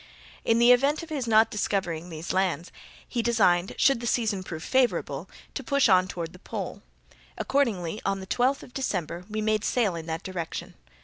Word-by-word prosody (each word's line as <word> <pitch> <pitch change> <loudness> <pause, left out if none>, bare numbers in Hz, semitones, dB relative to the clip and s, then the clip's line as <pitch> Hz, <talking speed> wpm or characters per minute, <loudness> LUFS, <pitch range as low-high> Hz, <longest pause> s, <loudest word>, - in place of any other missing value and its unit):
In 230 - +3
the 240 +1 +6
event 280 +6 +3
of 330 - -10
his 280 -6 -3
not 220 0 +5
discovering 180 -6 -2
these 160 0 -5
lands, 185 -2 0 0.4
he 240 - -1
designed, 195 -6 +2
should 275 -3 +4
the 235 - -4
season 220 -4 +1
prove 165 -3 -7
favourable, 260 -2 0 0.2
to - - -4
push 280 -2 +3
on 185 -2 +5
toward 170 -2 -5
the 180 - -13
pole. - - -6 0.6
Accordingly, 215 -9 0
on 195 0 0
the 190 - -7
twelfth 250 +7 +1
of 245 - -14
December, 180 - -3
we 215 0 -2
made 215 0 +1
sail 220 -8 +1
in 165 -1 -6
that 160 +2 -3
direction. 180 -4 -5
210 Hz, 185 wpm, -27 LUFS, 180-240 Hz, 0.6 s, the